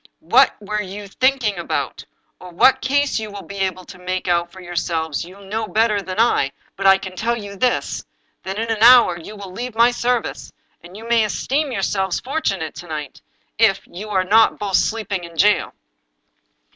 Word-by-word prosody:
What - - +6
you 210 -1 -4
were - - -9
think 260 +6 +1
ing 205 -4 0
about, 170 - -3 0.3
or 180 - -11
what 260 +9 +4
case 285 -1 +1
you 215 -1 -5
will 200 -1 -8
be 200 - -9
able 185 -1 -2
to 180 - -12
make 185 +1 -3
out 175 -1 +1
for 190 - -13
yourselves, 170 -4 -2
you 185 +3 -13
know 215 +3 -4
better 215 -1 +1
than 190 +1 -5
I; 180 -12 +2 0.2
but 195 0 0
I 195 0 +7
can 190 -1 -8
tell 235 +5 -1
you 200 -2 -8
this 250 +5 0 0.2
— - - -45
that 190 +1 -5
in 225 +1 -2
an 220 -1 -2
hour 235 -7 +7
you 210 +6 -10
will 200 -2 -9
leave 240 +4 -6
my 235 +2 +5
service, 245 0 -2 0.3
and 175 +3 -12
you 225 +2 -10
may 235 -1 +3
esteem 275 +7 -1
yourselves 190 -3 -1
fortunate 200 - -2
if, - - -6
to 175 - -14
night, 150 -4 -6 0.6
you 205 +5 -9
are 190 -3 +1
not 220 +4 +4
both 205 -1 -4
of - - +4
you - - +4
sleeping 210 -4 -3
in 170 -1 -11
jail." 210 +4 +3
200 Hz, 205 wpm, -20 LUFS, 185-225 Hz, 0.6 s, I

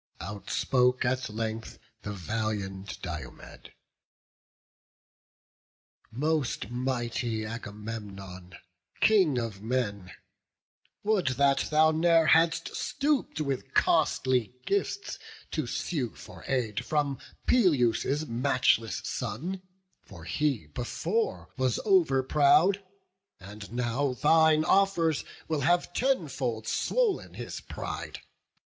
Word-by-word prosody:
Outspoke 125 +6 0
at 130 0 0
length 110 +1 -4 0.2
the 105 - -5
valiant 100 -1 -4
Diomed: - - -8 2.4
"Most 135 -4 -1
mighty 120 -3 -2
Agamemnon, 105 -5 -7 0.4
King 185 -11 +4
of 115 -5 -3
men, 105 -5 -2 0.9
Would 205 -6 +1
that 140 0 +3
thou 155 +1 +5
ne'er 165 +1 +4
hadst 165 +1 +3
stoop'd 285 - -1
with 140 -3 -3
costly 125 -3 +2
gifts 405 0 -1 0.3
To 155 -6 -2
sue 125 -2 -2
for - - -12
aid 115 -6 -1
from 145 -3 0 0.3
Peleus' 145 - +3
matchless 120 -3 +1
son; 140 - -4 0.4
For - - -13
he 145 - -1
before 120 - -2
was 130 -2 +1
over 165 -10 +4
proud, 160 +8 +4 0.6
and 100 +1 -10
now 125 +3 0
Thine 160 +3 +4
offers 175 -6 +3 0.2
will 155 -3 -1
have 175 +5 +2
tenfold 140 - -1
swoll'n 475 - 0
his - - -6
pride. - - -6
130 Hz, 95 wpm, -28 LUFS, 110-160 Hz, 2.4 s, thou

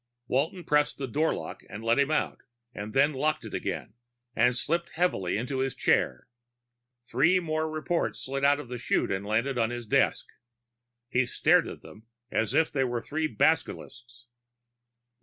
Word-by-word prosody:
Walton 160 +8 0
pressed 150 -1 +2
the 135 - -3
doorlock 150 +6 -1
to 105 - -10
let 115 +4 +1
him 140 +1 +3
out, 155 - -1 0.3
then 135 +9 +1
locked 155 0 0
it 110 - -8
again - - -4 0.4
and 120 +2 +3
slipped 170 +6 -1
heavily 130 - +1
into 130 +4 -2
his 135 0 -1
chair. 65 - +1 0.8
Three 160 +11 +3
more 155 -2 -1
reports 155 +2 -1
slid 135 +1 -3
out 145 +1 +4
of 150 - -7
the 125 0 -6
chute - - 0
and 95 +1 -1
landed 120 +4 0
on 115 -1 +2
his 120 -1 -5
desk. - - +2 0.8
He 125 0 +1
stared - - +3
at - - -9
them 110 +2 -14 0.2
as 110 - 0
if 160 0 +3
they 135 - +1
were 120 -2 -2
three 155 +1 -1
basilisks. 125 -6 -1
135 Hz, 160 wpm, -28 LUFS, 120-155 Hz, 0.8 s, out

